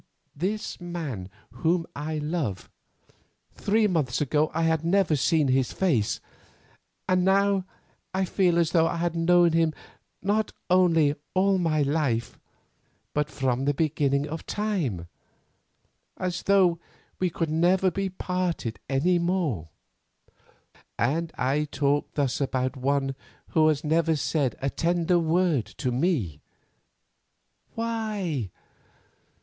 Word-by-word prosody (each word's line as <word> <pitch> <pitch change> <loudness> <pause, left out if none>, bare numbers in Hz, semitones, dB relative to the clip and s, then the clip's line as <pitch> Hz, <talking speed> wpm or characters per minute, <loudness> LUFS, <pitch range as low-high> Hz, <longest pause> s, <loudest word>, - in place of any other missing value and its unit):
This 200 +5 -3
man 155 - -5 0.2
whom 165 +8 0
I 155 +2 -3
love—three 155 - -4
months 155 - 0
ago 150 +2 +1
I 165 +1 -1
had 160 -1 +1
never 170 -2 +2
seen 150 +1 +2
his 130 -1 +2
face—and 180 - -3
now 195 0 +3 0.5
I 190 0 0
feel 180 -1 +2
as 170 -1 +2
though 165 -2 +4
I - - -2
had 170 0 -1
known 170 +1 +4
him 165 -1 +2 0.5
not 210 +2 0 0.2
only 165 -5 +4 0.2
all 190 0 +3
my 155 -4 +1
life, 140 -6 -1 0.7
but 150 0 0
from 135 -2 -1
the 145 0 +1
beginning 145 -2 +1
of 160 +2 -6
time—as 175 - -2 1.4
though 185 -4 +3 0.4
we 185 -2 +1 0.2
never 180 +4 +2
could - - -19
be 195 +1 -1
parted 180 -10 -3
any 170 +7 +2
more. 170 - -1 1.3
"And 160 +8 0
I 140 +4 +1
talk 145 0 0
thus 140 -2 0
about 130 0 -1
one 135 +1 0 0.4
who 155 -1 +4
has 155 -2 +1
never 160 +1 +2
said 145 -4 0
a 135 - 0
tender 175 +1 +1
word 165 -5 +2
to 130 -3 -1
me. 120 - 0 1.3
Why? 215 - -2
160 Hz, 115 wpm, -26 LUFS, 140-180 Hz, 1.4 s, though